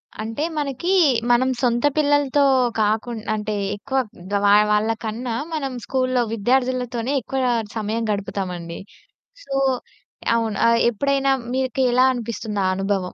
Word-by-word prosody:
అ - - -15
అంటే 225 +6 -3
మనకి 290 +4 -2 0.4
మనం 250 +2 +3
సొంత 240 0 +1
పిల్లలతో 290 -1 +3 0.4
కాకుండ్ 220 +1 0
అంటే 215 0 -3 0.2
ఎక్కువ 265 +6 -4 0.3
గ - - -3
వా 200 - +6 0.2
వాళ్ళ 210 +1 +2 0.2
కన్నా 230 +2 -3 0.2
మనం 275 -4 -2
స్కూలులో 255 -1 +1
విద్యార్థులతోనే 250 +2 0
ఎక్కువ 265 +4 -3 0.4
సమయం 220 +2 -2
గడుపుతామండి. 180 -4 -4 0.6
సో 275 - -7 0.8
అవును. 225 -3 -1
ఆహ్, 230 0 +4
ఎప్పుడైనా 275 +3 +1 0.2
మీక 260 -1 -2 0.2
ఎలా 255 +1 +5
అనిపిస్తుందా 220 -4 -3
అనుభవం? 195 -1 -1
235 Hz, 125 wpm, -22 LUFS, 210-265 Hz, 0.8 s, వా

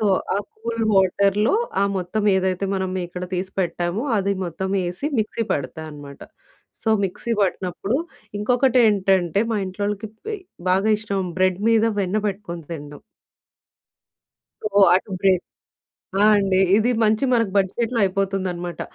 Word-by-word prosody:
So, 215 - +1 0.3
ఆ - - +1 0.2
cool 230 0 -3
వాటర్‌లో 200 - +3 0.3
ఆ - - +4
మొత్తం 185 +4 -2
ఏదైతే 190 0 0
మనం 190 -1 -1
మీగడ 180 0 -5
తీసి 185 +1 -3
పెట్టామో, 175 - -1
అది 200 +1 +1
మొత్తం 180 +2 -4
వేసి 180 +9 -3
మిక్సీ 220 +2 -2
పడతాన్నమాట. 145 -1 -6 0.6
సో, 225 - -2 0.2
మిక్సీ 215 +5 -3
పట్టినప్పుడు 190 +5 -1 0.4
ఇంకొకటేంటంటే 210 - +3
మా 220 - +1
ఇంట్లోళ్ళకి 205 +3 -3 0.2
బెయ్ 420 -3 -4 0.3
బాగా 195 +4 +2
ఇష్టం 200 -2 -2 0.2
బ్రెడ్ 185 -1 +2
మీద 225 -1 +4 0.2
వెన్న 190 +1 -1
పెట్టుకొని 190 -4 -4
తినడం. 145 -2 -8 1.8
ఓహ్! 195 - +8
అటు 190 +2 0
బ్రేక్ 190 -2 +4 0.8
ఆ! - - +5
అండి. 195 -2 +2 0.2
ఇది 225 +3 +2
మంచి 220 +4 +3
మనకు 230 -4 +2
బడ్జెట్‌లో 230 +5 0
అయిపోతుందన్నమాట. 185 -2 -2
195 Hz, 125 wpm, -22 LUFS, 180-215 Hz, 1.8 s, ఓహ్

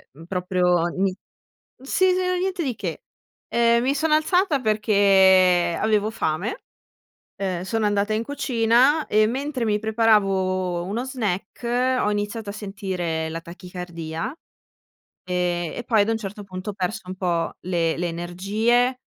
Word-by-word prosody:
uhm, 160 +3 -12
proprio 180 -1 +1
n 195 +3 0 0.7
sì, 370 +7 +2
s - - 0
era 365 0 0
niente 365 -1 -1
di 255 -4 -2
che. - - -5 0.4
Ehm, 235 0 +3
mi 270 +3 +1
sono 310 +2 +1
alzata 315 -1 +2
perché 195 -5 +4
avevo 215 -1 +2
fame, 185 0 -2 0.7
uhm, 190 -3 -3
sono 220 +2 -1
andata 205 +1 +1
in 220 +2 0
cucina 260 +2 +2
e 215 0 +3
mentre 265 0 -2
mi 210 -1 +2
preparavo 195 -5 +1
uno 220 +6 -3
snack 245 +2 -1
ho 210 - +1
iniziato 205 +1 -3
a - - -5
sentire 185 -6 -3
la 165 +1 -5
tachicardia, 170 - -6 1.0
ehm, 175 -2 -1
e 240 - -5
poi 220 -4 +3
ad 205 - +1
un 225 - +1
certo 205 -1 -7
punto 185 0 -7
ho - - -12
perso 200 +4 -3
un 185 - -5
po' 175 -3 -1
le 170 -3 +1
le 175 +1 -1
energie, 210 +9 0
205 Hz, 145 wpm, -23 LUFS, 180-235 Hz, 1.0 s, perché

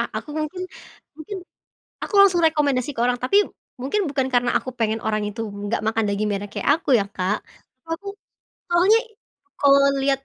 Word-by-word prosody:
a - - -2
aku 295 - -9
mungkin 315 +4 -3 0.5
mungkin 315 +6 -7 0.7
aku - - -8
langsung 365 -4 +5
rekomendasi 290 -4 +1
ke 230 - -6
orang, 245 +1 +2
tapi 255 +12 +3 0.4
mungkin, 380 +11 0
bukan 270 -3 -1
karena 245 -1 +1
aku 255 - 0
pengen 225 -1 0
orang 215 -1 -1
itu, 210 +2 -5
nggak 205 +2 -3
makan 220 0 0
daging 205 +1 -1
merah 200 0 -2
kek, - - -4
aku, 285 -1 +2
ya, 200 - -3
Kak. 195 +1 -2 0.5
Aku, 395 +5 -4 0.6
awalnya 380 +6 +5 0.6
kalau 280 -1 +6 0.2
liat, 270 0 +1
265 Hz, 170 wpm, -22 LUFS, 220-315 Hz, 0.7 s, kalau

